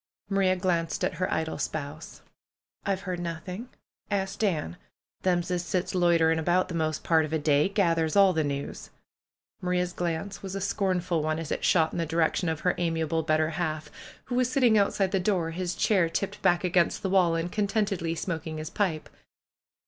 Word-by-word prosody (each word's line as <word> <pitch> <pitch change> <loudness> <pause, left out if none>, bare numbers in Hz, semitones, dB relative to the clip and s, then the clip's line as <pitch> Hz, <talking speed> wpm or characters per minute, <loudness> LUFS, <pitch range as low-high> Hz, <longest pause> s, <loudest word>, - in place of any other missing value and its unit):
Marie 195 -1 +3
glanced 170 -4 -1
at - - -1
her - - 0
idle 160 0 -2
spouse. 155 +1 -5 0.6
^M've 195 -1 0
heard 185 -2 -4
nothing. 180 +7 -5 0.4
Ask 195 -1 -2
Dan. 160 - -1 0.4
Them's 180 -1 +1
as 175 -1 0
sits 180 +1 -2
loiter 170 -3 +4
ing 165 - +1
about 175 +3 +1
the - - -5
most 155 -2 -1
part 160 -1 +3
of 155 - -5
a 160 - +1
day 150 +2 +2
gathers 165 -5 +1
all 195 -2 +6
the 160 - +1
news." 140 -1 -4 0.7
Maria's 180 0 0
glance 175 +3 -3
was 195 -1 -6
a - - -2
scornful 185 -4 0
one, 155 +1 -1
as 165 -2 -5
it - - -2
shot 160 -3 +3
in - - -4
the 165 - -1
di 160 - -5
rection 165 +1 +2
of 160 - -5
her 180 - +2
amiable 165 -1 0
better 155 0 +1
half, 155 -2 -3 0.3
who - - -6
was 250 0 +1
sitting 250 -4 +4
out 200 -2 +4
side 195 -2 0
the 195 - +2
door, 180 -4 0
his 175 +1 -3
chair 185 -6 +2
tipped 195 +4 -3
back 175 -2 +3
against 175 -1 +1
the 190 - 0
wall, 180 -4 +4
and 165 +1 -2
contentedly 200 -5 0
smoking 160 -2 -4
his 155 +1 -6
pipe. 175 -7 -1
175 Hz, 195 wpm, -27 LUFS, 160-190 Hz, 0.7 s, all